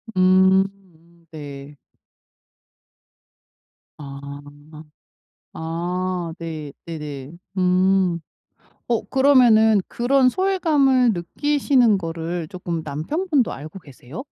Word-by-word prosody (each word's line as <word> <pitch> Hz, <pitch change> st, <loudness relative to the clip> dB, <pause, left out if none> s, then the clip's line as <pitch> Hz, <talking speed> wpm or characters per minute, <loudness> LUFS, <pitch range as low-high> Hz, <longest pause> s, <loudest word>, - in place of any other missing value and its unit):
음 -, -, 0 dB, 0.8 s
음 170 Hz, +1 st, -26 dB
네. 145 Hz, -1 st, -9 dB, 2.2 s
아. 140 Hz, -2 st, -9 dB, 1.3 s
아 175 Hz, +1 st, -3 dB
네 155 Hz, -3 st, -6 dB
네네. 150 Hz, -4 st, -7 dB, 0.3 s
음. 185 Hz, -1 st, +2 dB, 0.7 s
어 235 Hz, -2 st, +1 dB
그러면은 240 Hz, -6 st, +5 dB
그런 255 Hz, +2 st, +2 dB
소외감을 295 Hz, -9 st, +2 dB
느끼시는 250 Hz, -, +1 dB
거를 165 Hz, -1 st, -4 dB
쪼끔 170 Hz, -3 st, -4 dB
남편분도 265 Hz, -, -1 dB
알고 155 Hz, +7 st, -9 dB
계세요? 140 Hz, -, -11 dB
180 Hz, 155 characters per minute, -22 LUFS, 160-250 Hz, 2.2 s, 그러면은